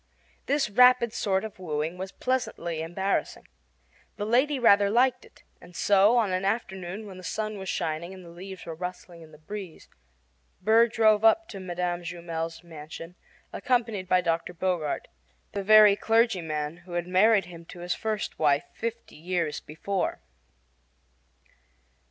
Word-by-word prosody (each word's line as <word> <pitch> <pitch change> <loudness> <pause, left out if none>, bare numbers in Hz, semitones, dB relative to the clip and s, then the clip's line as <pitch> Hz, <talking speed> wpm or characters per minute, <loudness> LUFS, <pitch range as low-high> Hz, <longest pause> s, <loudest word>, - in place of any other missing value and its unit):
This 285 -1 +1
rapid 250 +1 +5
sort 190 -1 0
of 220 -3 -8
wooing 160 -1 -3
was 190 +1 -6
pleasantly 175 -10 -2
embarrassing. 190 +4 -2 0.7
The 205 - -3
lady 260 +6 +2
rather 205 -5 +5
liked 250 +3 +2
it; - - -21 0.2
and 175 0 -15
so, 205 +5 +4
on 220 -5 +2
an 185 +1 -1
afternoon 195 -1 -3
when 190 -3 -10
the 185 - -11
sun 215 +2 -3
was 190 -1 -6
shining 165 +1 -2
and 185 -2 -11
the 170 - -12
leaves 185 +2 -9
were 165 - -5
rustling 180 0 -7
in 160 -1 -14
the 150 - -15
breeze, 185 +2 -9 0.7
Burr 225 +4 +5
drove 220 -2 +3
up 310 +10 +4
to 200 - -7
Mme. 175 -1 -3
Jumel's 170 -1 -5
mansion 165 +1 -10 0.4
accompanied 230 -7 -1
by 185 0 +4
Dr. 170 +1 -2
Bogart 175 -4 -2 0.4
the 200 - -3
very 210 0 +7
clergyman 175 -10 0
who 175 0 -13
had 175 0 -1
married 195 +2 +4
him 170 -1 -11
to 175 - -11
his 175 +1 -1
first 215 -2 -3
wife 145 -2 +3
fifty 230 0 -6
years 170 -1 -2
before. 185 +5 -3
185 Hz, 150 wpm, -27 LUFS, 170-215 Hz, 0.7 s, very